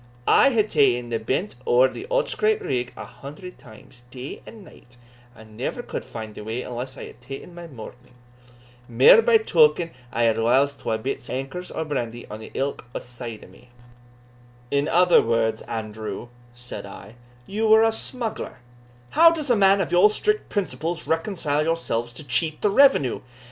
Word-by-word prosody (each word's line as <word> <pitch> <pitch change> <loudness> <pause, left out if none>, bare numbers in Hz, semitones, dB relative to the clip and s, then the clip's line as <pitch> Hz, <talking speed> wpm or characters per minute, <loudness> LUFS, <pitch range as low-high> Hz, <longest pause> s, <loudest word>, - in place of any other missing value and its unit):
I 275 - +6
hae 230 -5 +2
taen 130 - +2
the 115 -1 -1
bent 135 - -2
ower 125 +2 +5
the 390 - -8
Otterscrape 440 -3 +1
rigg 125 -1 -2
a 110 - -7
hundred 140 - -11
times, 120 +3 -16
day 130 +2 -8
and 220 -3 -12
night, 120 -8 -18 0.4
and 110 -2 -15
never 135 - -4
could - - -5
find 110 -2 -8
the 105 - -9
way 115 +4 -4
unless 125 +2 -6
I - - -8
had - - -14
taen 135 +7 -9
my 170 0 -9
morning; 125 -2 -12 0.7
mair 125 - +7
by 470 -1 +5
token 440 - +3
that - - -24 0.2
I 120 - 0
had 115 -1 +2
whiles 130 +5 +3
twa 110 -5 -2
bits 130 +5 -5
o' - - -4
ankers 135 +8 -6
o' 160 - -2
brandy 120 -5 -4
on 110 +1 -7
ilk 135 +5 -4 0.2
side 120 -3 -8
o' - - -13
me." 125 - -19 1.0
"In 140 +1 +1
other 180 +2 +5
words, 115 -1 0
Andrew," 110 +1 -6 0.3
said 120 -4 -8
I, 100 +2 -11 0.3
"you 215 - -1
were 220 +1 +6
a 225 - +3
smuggler 230 0 -4 0.5
how 335 +1 +7
does 310 -5 -1
a - - +5
man 195 -1 +4
of 170 - -3
your 180 +4 +6
strict 425 - -1
principles 175 -4 -3
reconcile 160 -3 -1
yourself 155 -8 -1
to 155 - -6
cheat 155 +5 0
the 210 - +3
revenue?" 240 - +4
140 Hz, 175 wpm, -23 LUFS, 120-195 Hz, 1.0 s, mair